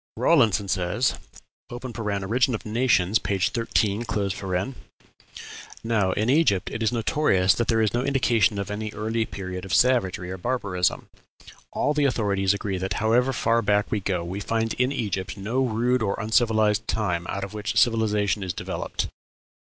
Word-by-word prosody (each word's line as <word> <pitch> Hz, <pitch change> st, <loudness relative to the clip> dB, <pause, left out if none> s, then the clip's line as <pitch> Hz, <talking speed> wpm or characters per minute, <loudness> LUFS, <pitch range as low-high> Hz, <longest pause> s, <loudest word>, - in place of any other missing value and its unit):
Rawlinson 110 Hz, -, +3 dB
says 95 Hz, +7 st, 0 dB, 0.6 s
("Origin 115 Hz, -1 st, -1 dB
of -, -, -8 dB
Nations," 110 Hz, -3 st, +2 dB
p. 100 Hz, -, -2 dB
13): 105 Hz, +1 st, 0 dB, 1.8 s
"Now, 110 Hz, -5 st, +1 dB
in 110 Hz, -, -1 dB
Egypt, 130 Hz, -, +2 dB
it 110 Hz, -, -5 dB
is 110 Hz, -, +2 dB
notorious 110 Hz, -5 st, +2 dB
that 120 Hz, -, -1 dB
there 115 Hz, -1 st, +2 dB
is 110 Hz, -, 0 dB
no 120 Hz, -, +1 dB
indication 120 Hz, -6 st, +2 dB
of 100 Hz, 0 st, -4 dB
any 110 Hz, +1 st, -4 dB
early 110 Hz, +1 st, -1 dB
period 95 Hz, -2 st, -6 dB
of 95 Hz, -3 st, -1 dB
savagery 95 Hz, -8 st, +2 dB
or 95 Hz, -, -6 dB
barbarism. 100 Hz, -6 st, -1 dB, 0.6 s
All 145 Hz, -, 0 dB
the 150 Hz, -1 st, +1 dB
authorities 100 Hz, -7 st, +1 dB
agree 100 Hz, -2 st, -3 dB
that, 95 Hz, +2 st, -2 dB
however 115 Hz, +5 st, +2 dB
far 115 Hz, -2 st, +1 dB
back 105 Hz, -1 st, +1 dB
we 105 Hz, -, +1 dB
go, 90 Hz, -3 st, -2 dB
we 90 Hz, +4 st, -5 dB
find 115 Hz, +2 st, -1 dB
in 125 Hz, +1 st, 0 dB
Egypt 100 Hz, -6 st, -3 dB
no 115 Hz, +7 st, -1 dB
rude 125 Hz, +1 st, +1 dB
or 100 Hz, -1 st, -1 dB
uncivilized 110 Hz, -1 st, +2 dB
time 90 Hz, -6 st, -1 dB
out 100 Hz, -, -3 dB
of 100 Hz, -, -6 dB
which 105 Hz, 0 st, -3 dB
civilization 105 Hz, -3 st, +2 dB
is 95 Hz, -2 st, -3 dB
developed. -, -, -4 dB
110 Hz, 155 wpm, -25 LUFS, 100-120 Hz, 1.8 s, Rawlinson